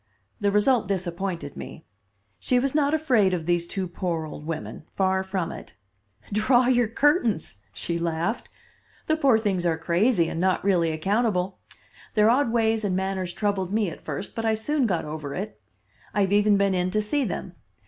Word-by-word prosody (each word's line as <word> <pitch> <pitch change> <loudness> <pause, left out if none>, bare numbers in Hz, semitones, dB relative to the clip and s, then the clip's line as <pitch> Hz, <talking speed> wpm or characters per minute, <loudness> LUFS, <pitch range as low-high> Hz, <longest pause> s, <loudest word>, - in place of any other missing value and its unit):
The 205 - +2
result 210 +2 +3
disappointed 180 -4 -3
me; - - -9 0.5
she 250 - +1
was 260 +2 +1
not 290 -1 +2
afraid 240 -12 +3
of 165 -3 -5
these 175 0 +1
two 190 +1 -3
poor 170 -2 -3
old 150 0 -9
women. 160 -1 -5
Far 190 0 +1
from 190 -3 -2
it. - - -10 0.6
"Draw 245 +4 +4
your 245 -2 +3
curtains," 230 - +1
she 105 - -3
laughed. 170 +6 -2 0.6
"The 315 - +2
poor 275 -7 +4
things 200 -5 -1
are 165 -2 +1
crazy 170 +3 +2
and 165 - -3
not 185 0 +1
really 175 -4 +2
accountable. 190 +2 0 0.6
Their 215 +1 +5
odd 255 -1 +2
ways 225 -1 +1
and 195 -3 0
manners 190 -1 -2
troubled 195 -2 -1
me 210 -4 +1
at - - -11
first, 195 - -5
but 225 - -3
I 220 -1 +2
soon 265 +4 0
got 180 -5 -1
over 150 -2 -5
it. 205 +3 -6 0.5
I 205 - +3
have 195 0 +1
even 205 0 +4
been 200 -1 +2
in 180 0 0
to 215 +3 +1
see 285 +7 0
them. 185 -4 -4
195 Hz, 180 wpm, -25 LUFS, 175-225 Hz, 0.6 s, Their